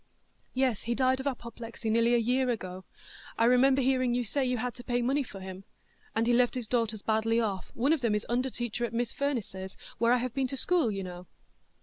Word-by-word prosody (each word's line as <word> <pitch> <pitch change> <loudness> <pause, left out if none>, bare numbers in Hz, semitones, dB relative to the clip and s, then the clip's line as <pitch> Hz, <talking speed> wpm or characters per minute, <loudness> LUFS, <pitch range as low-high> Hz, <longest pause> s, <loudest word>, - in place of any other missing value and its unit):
"Yes, 255 -5 +1
he 235 +1 -1
died 260 0 +2
of 265 - -3
apoplexy 235 -3 -5
nearly 230 +2 +4
a - - +5
year 250 +3 +2
ago. 190 -5 -4 0.5
I 230 - +4
remember 260 +2 +5
hearing 255 -2 +2
you 245 - +1
say 270 +5 -1
you 250 -1 0
had 245 +1 -2
to 245 - -11
pay 245 0 0
money 270 +4 +2
for 210 -7 -8
him; 190 0 -8 0.5
and 225 +1 +2
he 240 - +3
left 245 +1 +3
his 245 -3 -3
daughters 225 -3 0
badly 225 +1 +2
off; 200 -5 -2
one 270 +6 +3
of 315 - 0
them 230 -4 +2
is 210 - -2
under 250 +3 0
teacher 240 -1 -4
at 235 -1 -2
Miss 235 -1 -1
Firniss's, 210 -9 -3 0.2
where 235 0 +4
I've 250 -1 0
been 270 0 0
to 270 - -4
school, 340 -4 +2
you 195 -2 -3
know." 180 -1 -8
240 Hz, 225 wpm, -29 LUFS, 220-255 Hz, 0.5 s, a